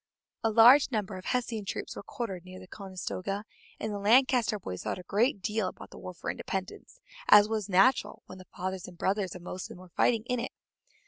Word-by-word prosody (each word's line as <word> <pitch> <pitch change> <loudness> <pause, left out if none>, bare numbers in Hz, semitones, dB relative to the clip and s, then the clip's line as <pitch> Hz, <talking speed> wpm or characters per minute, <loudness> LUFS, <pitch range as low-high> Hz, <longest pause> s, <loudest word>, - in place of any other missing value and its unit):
A 225 - +3
large 235 +6 +7
number 210 -5 -2
of 185 - -10
Hessian 235 -4 -1
troops 195 - -5
were - - -6
quartered 200 -5 -5
near 185 0 -11
the 185 - -11
Conestoga, 195 +1 -5 0.4
and 215 -1 -3
the 205 - -3
Lancaster 235 +1 +4
boys 90 - -6
thought - - -3
a 185 - -9
great 205 +1 +1
deal 215 -3 0
about - - -9
the - - -11
War 185 - -8
for - - -3
Independence, 190 +1 -6 0.3
as 210 0 +9
was 215 -2 -2
natural 200 +8 +3
when 185 - -11
the 185 - -12
fathers 185 0 -5
and 180 -1 -12
brothers 190 0 -1
of 180 - -10
most 185 +1 -6
of - - -9
them - - -13
were 185 0 -13
fighting 225 +5 +2
in 250 0 -1
it. 240 - -4
200 Hz, 215 wpm, -29 LUFS, 185-225 Hz, 0.4 s, as